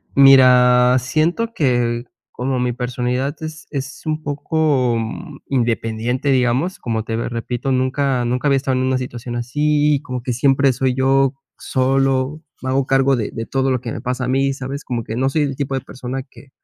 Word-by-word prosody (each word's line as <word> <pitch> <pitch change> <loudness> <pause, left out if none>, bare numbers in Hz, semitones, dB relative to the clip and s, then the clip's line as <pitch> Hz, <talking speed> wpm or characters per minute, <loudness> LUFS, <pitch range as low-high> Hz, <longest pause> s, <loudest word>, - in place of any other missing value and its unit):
Mira, 125 -2 +6
siento 165 - 0
que 120 - +1 0.3
como 130 0 -2
mi 125 -1 0
personalidad 125 +3 -2
es 155 0 -7
es 140 -1 -5
un 155 0 -2
poco, 145 -4 0
mm, 110 -1 -6
independiente, 120 +1 -1
digamos, 130 +8 +1
como, 110 -2 -2
te 115 0 -3
ve 115 - -2
repito, 120 +3 -3
nunca 130 0 0
nunca 125 +4 0
había 140 -1 +4
estado 135 -1 -1
en 130 - 0
una 130 0 +1
situación 120 -1 -6
así, 150 +3 +1
como 125 -3 -5
que 125 -1 -2
siempre 135 +2 +3
soy 130 0 0
yo 135 +1 +3 0.2
solo, 135 +2 0 0.2
me 130 - -4
hago 135 +1 +1
cargo 135 0 +3
de 110 -4 -3
de 115 - -5
todo 135 +1 0
lo 125 - +1
que 115 -1 -6
me - - -6
pasa 125 0 -2
a - - -3
mí, 135 +1 +1
¿sabes? 135 +1 -6
Como 120 -2 -3
que 110 - -5
no 130 +2 +1
soy 150 +2 +1
el 140 -2 -2
tipo 135 -1 -2
de 130 - -2
persona 130 +1 -6
que 140 - -16
130 Hz, 190 wpm, -19 LUFS, 125-140 Hz, 0.3 s, Mira